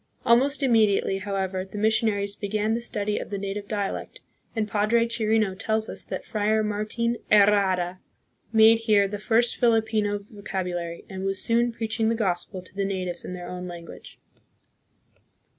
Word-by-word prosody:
Almost 275 +5 +4
immediately, 215 -5 +3
however, 190 -1 -2
the 195 +2 -10
mission 220 +2 +3
aries 200 -1 -2
began 215 +2 -1
the 235 - -1
study 210 -3 -2
of - - -7
the 200 - -3
native 200 +1 -4
dialect, 205 - -3 0.4
and 220 -2 0
Padre 215 +3 +2
Chirino 220 -3 +1
tells 220 +3 -1
us - - -4
that - - -5
Friar 215 +1 +1
Martin 215 +3 -1
Herrada 195 -3 +4 0.5
made 225 0 +6
here 210 -3 +3
the 205 +1 -5
first 230 +3 +2
Filipino 220 -3 +2
vocabulary, 185 -4 -5
and 190 0 -6
was 195 0 0
soon 235 +1 +2
preaching 225 0 -1
the 230 - +1
Gospel 185 -3 -2
to 185 - -14
the 200 0 -2
natives 185 -3 -3
in - - -6
their 175 -1 -7
own 180 0 -6
language. 170 -1 -10
210 Hz, 160 wpm, -25 LUFS, 195-225 Hz, 0.5 s, made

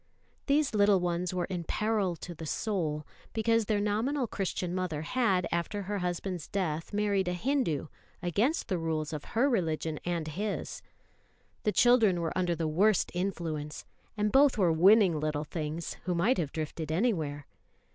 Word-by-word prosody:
These 285 -2 +2
little 205 -2 +4
ones 175 0 -1
were 180 -1 -1
in 180 -3 -4
"peril 210 -1 0
to 175 +2 -8
the 160 -1 -8
soul," 155 -7 -2 0.3
because 225 0 +2
their 210 -1 +1
nominal 225 +7 0
Christian 185 -4 -3
mother 180 -5 -2
had, 190 -3 +1
after 170 +4 -2
her 205 +1 -3
husband's 180 -1 -3
death, 165 -5 -2
married 205 -2 +1
a 180 - 0
Hindu, 220 - 0 0.3
against 205 - 0
the 185 -5 -1
rules 160 -1 -2
of 150 - -4
her 260 +4 +5
religion 160 - -1
and 170 -3 -2
his. 205 +6 -4 0.8
The 210 - +3
children 225 -6 +4
were 165 -1 -2
under 180 -2 +1
the 165 -1 -1
worst 190 +5 +2
influence; 165 -5 -3 0.3
and 210 0 +1
both 270 0 +5
were 180 -5 +3
winning 185 0 +5
little 150 -1 -1
things, 155 +1 -4
who 180 -1 0
might 200 +9 +2
have 150 -5 -2
drifted 155 0 -4
anywhere. 160 - 0
180 Hz, 160 wpm, -30 LUFS, 160-210 Hz, 0.8 s, her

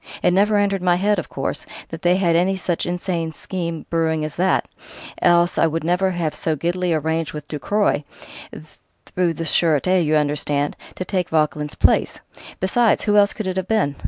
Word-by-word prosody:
It - - +4
never 205 +3 +3
entered 200 -2 +1
my 180 -1 +3
head, 200 +2 +1
of 175 - -7
course, - - -4 0.2
that 165 0 -8
they 175 +1 +3
had 175 -3 +2
any 185 +3 +2
such 180 -2 -2
insane 175 -2 -2
scheme 170 0 -5
brewing 160 -2 0
as 155 - -6
that 185 +2 +1 0.5
else 175 0 +3
I - - +4
would 160 0 -2
never 180 +3 +1
have 175 -4 -2
so 160 - -1
giddily 175 +4 -1
arranged 160 0 -1
with 150 -1 -7
Ducroy 160 +2 0 1.1
through 175 -2 +1
the 165 - -4
Sûreté, 170 +3 +2
you 155 0 +1
understand 145 -1 0 0.2
to 185 - -5
take 180 -3 -2
Vauquelin's 150 -1 0
place.... - - +2 0.4
Besides, 225 +5 +2
who 210 -1 +2
else 205 0 +5
could 215 - -5
it 185 0 -3
have 190 0 -2
been? 205 -11 +1
175 Hz, 185 wpm, -21 LUFS, 160-185 Hz, 1.1 s, else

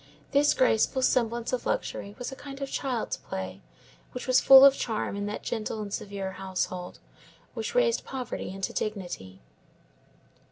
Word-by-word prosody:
This 285 +1 +4
graceful 255 +1 +2
semblance 235 -1 +1
of 255 - -1
luxury 200 +1 -3
was 245 - -5
a - - -7
kind 275 0 -9
of 275 -1 -4
child's 255 -5 -2
play, 95 0 -6 0.5
which 250 - -5
was 255 -1 +4
full 270 0 +10
of 275 - +8
charm 220 -5 -2
in 205 0 -3
that 210 - -5
gentle 220 -1 -3
and 205 -2 -5
severe 195 -2 -4
household, 185 -1 -4 0.6
which 475 - -4
raised - - +3
poverty 260 -3 -5
into 195 +1 -4
dignity. 175 - -5
225 Hz, 155 wpm, -28 LUFS, 195-265 Hz, 0.6 s, full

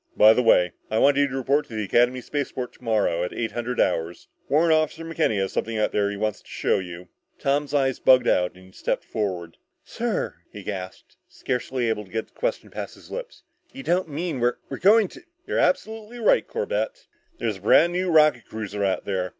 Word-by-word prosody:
"By 110 +1 +8
the 125 - +2
way, 90 -7 +4 0.2
I 110 - 0
want 140 +4 +4
you 145 0 +4
to 135 - -6
report 140 +3 +1
to 115 - -9
the 110 - -1
Academy 120 +5 +2
spaceport 130 -2 -4
tomorrow 105 -8 0
at 90 - -3
eight 115 -1 -2
hundred 120 +1 -3
hours. 80 +2 0 0.2
Warrant 160 +3 +4
Officer 155 +1 0
McKenny 160 -9 0
has 95 0 -1
something 115 0 -2
out 110 - +1
there 100 -1 +1
he 100 - -5
wants 105 0 -2
to - - -24
show - - 0
you." 90 -1 -8 0.3
Tom's 140 +1 0
eyes 135 -3 +1
bugged 130 -1 +5
out 90 0 +2
and 95 0 -15
he 95 - -18
stepped - - -3
forward. 90 -6 -3 0.3
"Sir," - - -3
he - - -9
gasped, 95 -1 -7
scarcely 125 -1 -2
able 110 -2 -1
to - - -20
get 110 0 -3
the - - -37
question - - -3
past - - -6
his - - -16
lips, - - -7 0.3
"you 270 - -8
don't 180 -4 +1
mean 155 -1 -3
we're 120 +1 +1
we're 135 - -5
going 210 +2 +5
to 350 - -13
" 350 +1 -47
"You're - - -1
absolutely 220 +5 0
right, 230 - +3
Corbett. - - -3 0.3
There's 105 -3 -2
a - - -18
brand 165 - +5
new 180 +1 0
rocket 155 -7 +4
cruiser 105 -2 -4
out 95 -1 0
there. 95 -2 -1
125 Hz, 215 wpm, -24 LUFS, 105-160 Hz, 0.3 s, By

